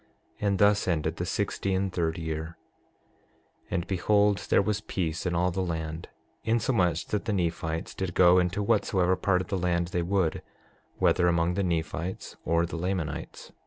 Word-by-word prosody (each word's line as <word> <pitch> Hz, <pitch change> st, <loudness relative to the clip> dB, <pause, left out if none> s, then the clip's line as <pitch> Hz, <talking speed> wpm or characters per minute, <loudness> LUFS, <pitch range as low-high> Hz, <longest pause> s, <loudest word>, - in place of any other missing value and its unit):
And 100 Hz, -2 st, +1 dB
thus 100 Hz, 0 st, +3 dB
ended 80 Hz, -4 st, 0 dB
the -, -, -3 dB
sixty 95 Hz, -1 st, -1 dB
and 95 Hz, -1 st, -1 dB
third 80 Hz, -2 st, -1 dB
year. 80 Hz, 0 st, -4 dB, 1.1 s
6:7 -, -, -34 dB
And 85 Hz, -1 st, -1 dB
behold, 100 Hz, +2 st, +2 dB
there -, -, +5 dB
was 105 Hz, 0 st, -1 dB
peace 85 Hz, -4 st, -2 dB
in 85 Hz, -, -1 dB
all 90 Hz, +1 st, +2 dB
the 95 Hz, +2 st, -2 dB
land, 80 Hz, -2 st, -4 dB, 0.3 s
insomuch 100 Hz, -, +1 dB
that 105 Hz, -, -1 dB
the 110 Hz, -, 0 dB
Nephites 85 Hz, -2 st, -2 dB
did 95 Hz, -3 st, -4 dB
go 90 Hz, 0 st, +6 dB
into 90 Hz, +3 st, 0 dB
whatsoever 95 Hz, -2 st, +2 dB
part 90 Hz, -1 st, +1 dB
of -, -, -8 dB
the 95 Hz, -, -1 dB
land 85 Hz, -1 st, 0 dB
they 90 Hz, -, -1 dB
would, 90 Hz, -2 st, 0 dB, 0.6 s
whether 90 Hz, -1 st, +3 dB
among 85 Hz, 0 st, +2 dB
the 100 Hz, -, 0 dB
Nephites 85 Hz, 0 st, -3 dB
or 85 Hz, +1 st, +2 dB
the 85 Hz, -, -5 dB
Lamanites. 90 Hz, -3 st, -4 dB
90 Hz, 170 wpm, -28 LUFS, 85-95 Hz, 1.1 s, go